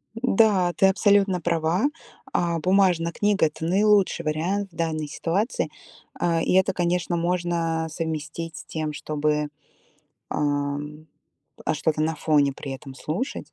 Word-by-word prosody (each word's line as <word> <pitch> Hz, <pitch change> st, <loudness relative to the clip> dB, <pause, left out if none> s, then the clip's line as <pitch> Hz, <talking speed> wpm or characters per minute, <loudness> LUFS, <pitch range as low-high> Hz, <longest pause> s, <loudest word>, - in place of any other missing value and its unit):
Да, 210 Hz, -6 st, +3 dB
ты 195 Hz, -, +4 dB
абсолютно 195 Hz, -1 st, +3 dB
права. 170 Hz, -, +1 dB, 0.5 s
А, 170 Hz, -1 st, +1 dB
бумажная 180 Hz, -1 st, +3 dB
книга- 205 Hz, -1 st, +2 dB
это 155 Hz, +1 st, -6 dB
наилучший 195 Hz, -1 st, +3 dB
вариант 180 Hz, +6 st, -1 dB
в -, -, -21 dB
данной 155 Hz, -2 st, -2 dB
ситуации. 185 Hz, -, -1 dB, 0.5 s
Э, 165 Hz, -1 st, +1 dB
и -, -, +1 dB
это, 190 Hz, 0 st, +4 dB
конечно, 175 Hz, 0 st, 0 dB
можно 170 Hz, -2 st, 0 dB
совместить 160 Hz, +1 st, -4 dB
с -, -, -9 dB
тем, 155 Hz, -1 st, -3 dB
чтобы, 150 Hz, 0 st, -1 dB, 0.8 s
эм, 145 Hz, +1 st, -2 dB, 0.6 s
э, -, -, +2 dB
что-то 155 Hz, 0 st, 0 dB
на 160 Hz, +1 st, 0 dB
фоне 150 Hz, -2 st, +2 dB
при 135 Hz, 0 st, -7 dB
этом 135 Hz, 0 st, -9 dB
слушать. 170 Hz, -, -4 dB
165 Hz, 135 wpm, -24 LUFS, 155-185 Hz, 0.8 s, ты